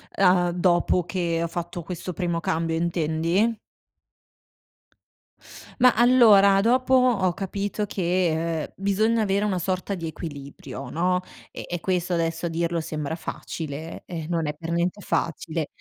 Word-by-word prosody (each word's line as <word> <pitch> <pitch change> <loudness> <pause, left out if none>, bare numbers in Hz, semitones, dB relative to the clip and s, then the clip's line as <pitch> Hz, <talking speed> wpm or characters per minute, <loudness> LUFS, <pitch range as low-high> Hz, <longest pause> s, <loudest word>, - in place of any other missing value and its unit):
E 195 - 0
uhm, 180 -1 +4
dopo 175 0 +2
che 170 -3 -1
ho 170 - 0
fatto 175 +1 -5
questo 180 +1 -6
primo 170 -2 -1
cambio, 165 0 -1
intendi? 170 +6 0 2.2
Ma 250 -1 +7
allora 215 -5 +6
dopo 255 +3 +2
ho 235 -9 +4
capito 200 +2 -3
che, 170 -4 0
ehm, - - -9
bisogna 215 +4 +1
avere 200 +1 +1
una 190 -3 0
sorta 185 +2 -2
di 165 -2 -5
equilibrio, 140 -4 -8
no, 180 +2 +1 0.3
e - - -7
e 175 -1 -3
questo 180 0 -1
adesso 165 0 -1
a - - -1
dirlo 170 +1 -1
sembra 155 0 -4
facile, 160 -1 -6
eh 165 -3 -6
non 165 -3 -1
è 150 - -2
per 165 +2 -7
niente 175 +4 -1
facile. 165 -2 -2
175 Hz, 145 wpm, -24 LUFS, 165-195 Hz, 2.2 s, Ma